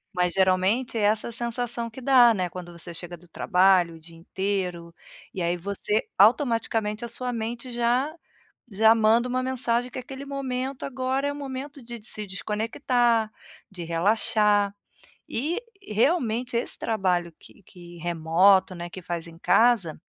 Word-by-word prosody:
mas, 180 -1 +1
geralmente, 190 +6 +2
é - - 0
essa 210 +1 +2
a - - -7
sensação 235 0 -3
que 230 +3 -11
dá, 250 -2 +6
né, 185 -4 -2
quando 175 -1 -8
você 170 0 -9
chega 175 +1 -7
do 180 - -20
trabalho 180 -1 +3
o 160 - -13
dia 165 +1 -13
inteiro, 180 -1 -3 0.4
e 190 - -4
aí 170 +1 0
você 200 +3 -1 0.2
automaticamente 225 -1 +2
a 235 - -4
sua 250 +1 -4
mente 235 +2 -4
já 245 +6 0 0.6
já 220 +3 +5
manda 225 +2 +3
uma 255 +1 -1
mensagem 250 -1 0
que 255 - -5
aquele 265 +2 -8
momento 265 -1 -4
agora 265 +1 -1
é 285 - 0
o - - -9
momento 275 0 -7
de 235 -1 -9
se 215 -2 -1
desconectar, 225 +3 0 0.4
de 185 -3 -8
relaxar. 205 +4 +2 0.6
E 310 - -2 0.3
realmente 240 - +1
esse 235 - -2
trabalho 180 -6 0
que 200 - -18
que 175 -1 -14
remoto, 175 +3 +3
né, 175 0 -7
que 185 - -8
faz 170 -1 -4
em 165 0 -13
casa 220 -5 +3
220 Hz, 160 wpm, -25 LUFS, 180-245 Hz, 0.6 s, dá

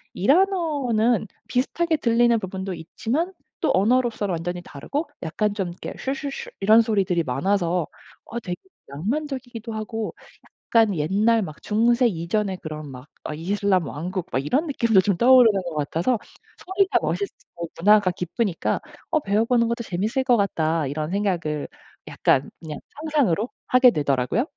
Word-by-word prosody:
이란어는 275 - +2 0.2
비슷하게 320 +6 0
들리는 235 -2 +3
부분도 190 0 -5
있지만 260 - -3 0.3
또 - - +2
언어로서는 225 -1 +2
완전히 175 +1 -3
다르고 285 - -4
약간 205 +6 -1
좀 195 -4 -2
이렇게 175 - -7
슈슈슈 275 +1 -4
이런 215 +3 +6
소리들이 195 -6 +1
많아서 175 +4 0 0.4
어 235 - -5
되게 180 -6 -4 0.3
낭만적이기도 235 - -4
하고 220 0 -4 0.6
약간 225 -3 +5
옛날 210 +9 +2
막 155 -6 -6
중세 235 +4 +3
이전의 190 +1 -1
그런 155 -1 -6
막 125 +1 -10 0.2
아 - - -3
이슬람 190 +1 +1
왕국 175 +5 -4
막 130 - 0
이런 270 - +1
느낌도 230 -8 +3
좀 195 0 +1
떠오르는 240 -5 +6
것 175 -3 -6
같아서 165 - 0 0.5
소리가 385 +1 +2
멋있고 170 - -4
문화가 205 0 +5
깊으니까 180 +1 -1 0.3
어 310 - +3
'배워보는 230 +1 +2
것도 235 +1 -2
재밌을 215 +7 -1
것 250 -2 +4
같다.' 165 -6 0
이런 155 +3 -3
생각을 175 -7 -1 0.4
약간 135 - +1
그냥 155 -3 -6 0.2
상상으로 275 - +1 0.2
하게 250 -1 +6
되더라고요. 145 - 0
210 Hz, 335 characters per minute, -23 LUFS, 175-245 Hz, 0.6 s, 이런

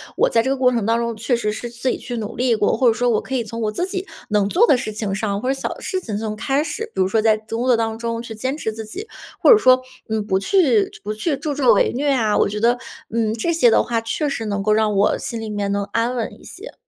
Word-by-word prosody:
我 - - +3
在 230 - +3
这 260 - -2
个 275 - +1
过 255 -1 +3
程 230 -4 -1
当 230 +1 +2
中 235 -1 -2
确 225 +3 0
实 210 -3 -1
是 230 +3 -5
自 240 +2 -2
己 - - -3
去 245 - -6
努 215 -1 -5
力 245 -2 +2
过， 215 +1 +1
或 250 +1 +3
者 225 - +5
说 245 +2 0
我 220 - +2
可 265 - -5
以 240 - 0
从 230 +2 -7
我 215 - 0
自 355 - -1
己 380 0 -4 0.2
能 205 -1 +2
做 370 - +4
的 265 - +5
事 215 -4 -4
情 210 -2 -3
上， 200 0 -2
或 255 - -2
者 - - +3
小 270 - -3
的 - - -14
事 375 - -2
情 215 - -4
中 215 -1 -3
开 275 +5 0
始。 450 +7 -5
比 - - +1
如 185 - +3
说 220 +2 +2
在 220 0 +4
工 220 +3 -4
作 255 -2 +4
当 225 0 -2
中 230 0 -3
去 230 - -7
坚 260 +6 -2
持 220 - -3
自 220 0 -7
己， 390 - -7 0.4
或 - - +7
者 455 - +9
说 255 -9 +5 0.3
你 220 -1 -1
不 195 -2 0
去 380 - +3
不 215 - -3
去 280 +8 -1
助 300 +1 -3
纣 260 -5 +4
为 - - +3
虐 285 +4 0
啊。 220 -5 +1
我 - - +3
觉 210 - -4
得， 240 +1 +3 0.4
嗯， 225 -2 +1
这 235 +9 -1
些 320 -8 +4
的 - - +4
话 230 -1 -1
确 255 +6 -2
实 225 -5 -3
能 200 -2 -2
够 215 - +1
让 215 -1 +2
我 200 +1 +3
心 230 -2 -5
里 220 - -5
面 205 -1 -2
能 200 - 0
安 230 +4 -1
稳 235 -3 -4
一 - - -19
些。 - - -9
230 Hz, 320 characters per minute, -21 LUFS, 215-260 Hz, 0.4 s, 者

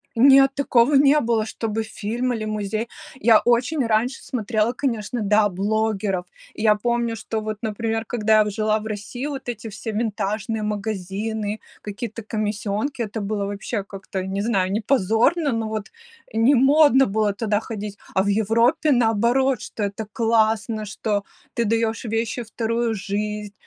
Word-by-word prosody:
Нет, 270 +2 +7
такого 275 -1 +3
не 285 +2 +6
было, 230 -4 +1
чтобы 225 0 -3
фильм 230 +3 -3
или 220 -2 -3
музей. 215 +1 -2 0.3
Я 230 -4 +5
очень 245 +3 +2
раньше 230 +4 0
смотрела, 225 -1 -1
конечно, 240 -4 -2
да, 210 +1 +4
блогеров. 200 -1 -1 0.3
И - - -6
я 215 -1 +5
помню, 235 +1 -1
что 220 0 -4
вот, 215 -1 -4
например, 225 0 -2
когда 220 -2 +2
я 215 - +6
в 210 - -2
жила 215 +1 0
в 215 - -9
России, 220 +6 -5
вот 275 -3 -6
эти 225 -1 -5
все 215 +2 -6
винтажные 215 0 -2
магазины, 210 +1 -3 0.2
какие-то 220 +1 -6
комиссионки, 215 +4 -2
это 220 0 -4
было 200 0 -2
вообще 205 +1 -3
как-то, 195 -1 -6
не 195 +1 -2
знаю, 195 -4 +1
не 215 +3 0
позорно, 270 - +2
но 225 -1 -1
вот 215 -2 -5 0.4
не 225 +6 +4
модно 270 +1 +5
было 210 -1 0
тогда 210 0 0
ходить. 210 -2 -6 0.2
А 190 - +3
в - - -2
Европе 225 +8 +2
наоборот, 245 +2 +2
что 215 - -5
это 205 +1 -3
классно, 220 -1 +1
что 205 +1 -2 0.3
ты 235 -1 0
даешь 225 +1 0
вещи 225 +2 -2
вторую 230 +1 -1
жизнь, 210 +1 -3
220 Hz, 155 wpm, -23 LUFS, 210-235 Hz, 0.4 s, Нет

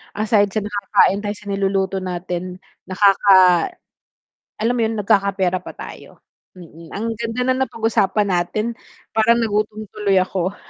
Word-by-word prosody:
aside 210 -1 +2
sa 215 - 0
nakakain 205 -1 +2
tayo 205 0 -4
sa 210 - -15
niluluto 195 -1 0
natin 180 0 -5 0.3
nakaka 195 +1 +4 1.2
Alam 230 +3 0
mo - - +2
yun? 225 0 -2
Nagkakapera 195 -3 +1
pa - - -10
tayo. - - -11 0.3
Mm, 165 -2 -13
ang 215 +3 -3
ganda 230 +1 -3
na 260 0 +2
napag-usapan 215 -3 0
natin 180 +5 -1 0.5
parang 230 +2 +3
nagutom 215 0 -1
tuloy 200 -2 0
ako. 185 +1 -2
205 Hz, 135 wpm, -20 LUFS, 190-215 Hz, 1.2 s, nakaka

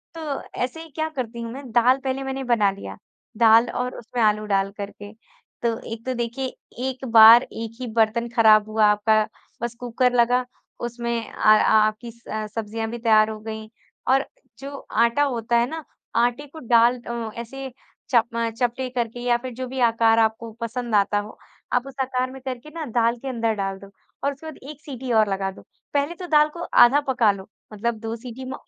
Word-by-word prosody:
तो 305 -4 -4 0.2
ऐसे 320 +6 -4
ही 325 - -13
क्या 315 0 -1
करती 235 -2 -4
हूँ 230 0 -5
मैं 270 -2 -9
दाल 245 +3 +4
पहले 265 0 -2
मैंने 270 0 -4
बना 225 -6 +2
लिया, 200 +2 -9 0.4
दाल 230 +1 +6
और 250 0 -3
उसमें 235 +1 -4
आलू 210 0 +2
डाल 195 -1 0
कर 200 -1 -5
के, 205 0 -11 0.5
तो 230 -1 0 0.2
एक 225 +1 -9
तो 260 - -1
देखिए 240 +2 -3 0.4
1 260 0 -7
बार 225 +2 +9
1 225 0 -8
ही 250 - -3
बर्तन 225 +1 +2
खराब 215 -2 +6
हुआ 215 0 +3
आपका, 210 +1 +3 0.3
बस 235 0 -3
कुकर 250 +1 +1
लगा, 245 +1 +3 0.3
उसमें 235 -1 -3
अ - - -13 0.2
अ, - - +2
आपकी 215 +2 +2
स 235 +1 -25 0.3
सब्जियाँ 225 0 -3
भी 235 - -5
तैयार 220 -2 +4
हो 215 - -6
गई 220 0 -7 0.4
और 270 +2 +3 0.3
जो 280 +1 -7 0.3
आटा 235 +5 +3
होता 240 -4 -1
है 235 +1 +2
ना, 320 -1 -6 0.3
आटे 245 +5 +1
को 315 +3 -12
डाल 235 +1 +4
अ, 235 -2 -4
ऐसे 265 +3 -8 0.4
चप 235 -4 +5
म 230 0 0
चपटे 250 +1 -1
करके 235 0 -2
या 240 0 +2
फिर 255 0 -7
जो 255 +2 -5
भी 260 +1 -5
आकार 225 0 +3
आपको 225 +1 0
पसंद 235 -1 -2
आता 205 0 +3
हो, 205 +1 -8 0.4
आप 250 +2 +1
उस 270 - -10
आकार 255 0 -1
में 265 - -9
करके 260 +2 -6
ना 325 -2 -5
दाल 235 -2 +1
के 270 - -8
अंदर 230 -3 0
डाल 195 -1 -3
दो, 200 - -13 0.3
और 280 - +1
उसके 285 +4 -15
बाद 315 - -8
1 295 -1 -14
सीटी 260 -4 -6
और 220 -2 +4
लगा 195 0 -1
दो। 190 - -14 0.3
पहले 285 +3 0
तो 360 0 -8
दाल 300 -1 +5
को 340 - -9 0.2
आधा 255 +4 +7
पका 245 -5 +3
लो 195 -1 -9 0.3
मतलब 235 +2 -1
2 225 +1 -4
सीटी 250 +2 -9
में 260 - -5
235 Hz, 205 wpm, -23 LUFS, 220-260 Hz, 0.5 s, बार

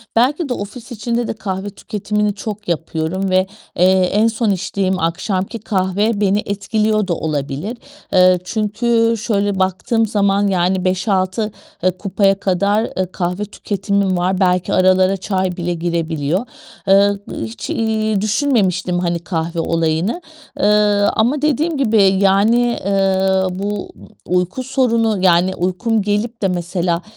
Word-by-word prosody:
belki 280 +6 +2
de - - +1
ofis 230 +5 -8
içinde 235 +1 -2
de - - -2
kahve 195 -2 -4
tüketimini 210 +1 -2
çok 210 0 -6
yapıyorum 165 +3 -2
ve, 185 +1 +2 0.3
eee, 175 - +2 0.3
en 215 +3 +3
son 225 -2 0
içtiğim 190 0 -1
akşamki 185 +5 -2
kahve 205 +2 0
beni 200 +1 +2
etkiliyor 210 +1 0
da 170 - 0
olabilir. 155 - -3 0.4
Eee, 185 -1 +5
çünkü 230 +3 +1
şöyle 205 -2 -1
baktığım 190 +5 +1
zaman 200 -1 +1
yani 185 0 +1
5-6, 190 +2 0 0.3
eee, 185 0 +1
kupaya 195 0 +1
kadar, 200 +3 +1
eee, 185 -1 -1
kahve 180 +3 -2
tüketimim 200 -2 -1
var. 185 +2 0
Belki 180 -1 +1
aralara 185 +1 +3
çay 185 -2 -2
bile 175 0 -2
girebiliyor. 165 - -1 0.4
Eee, 200 +1 +6 0.4
hiç, 115 +1 -7
ııı, 220 -2 0
düşünmemiştim 210 - +1
hani 170 -1 -1
kahve 165 -1 -3
olayını. 165 - 0 0.4
Eee, - - -1 0.5
ama 250 +6 +1
dediğim 305 +2 +1
gibi, 225 -6 +3
yani, 200 +5 +3
eee, 190 -1 +2
bu 200 +2 -4 0.4
uyku 180 +8 -1
sorunu, 230 -6 +1
yani 180 +1 +3
uykum 205 +5 0
gelip 210 +3 -2
de 195 - +2
mesela 175 -1 -1
195 Hz, 135 wpm, -18 LUFS, 185-215 Hz, 0.5 s, Eee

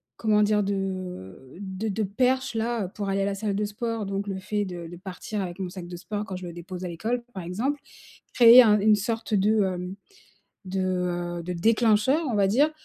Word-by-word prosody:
comment 210 -1 +2
dire 210 0 +3
de, 200 0 -1
heu, 180 - -6
de 195 +2 -4
de 210 +1 -1
perche 255 +6 +1
là 225 -3 -1
pour 200 +1 -5
aller 195 0 +1
à - - +1
la 200 - -1
salle 200 0 -2
de 210 - 0
sport 225 +1 -3
donc 195 +1 -3
le 195 -1 -3
fait 210 +2 -2
de 175 -3 -6
de 175 - -9
partir 195 +3 -5
avec 175 -1 -5
mon 185 -2 -4
sac 180 -1 -8
de 175 - -7
sport 205 +4 -4
quand 190 -3 -6
je 180 0 -7
le 170 - -7
dépose 180 +1 -7
à - - -2
l'école, 225 +8 -2
par 190 - -5
exemple, 235 +12 -2 0.6
créer 240 +1 +10
un 210 -3 +5
une 210 +1 +5
sorte 220 +2 -3
de 210 +2 +3
hem 185 0 -3 0.7
de, 190 0 -3 0.6
heu, 170 - -5
de 180 - -3
déclencheur 225 - +3
on 230 - -1
va 200 -1 +3
dire 285 +9 +3
200 Hz, 220 wpm, -26 LUFS, 185-220 Hz, 0.7 s, créer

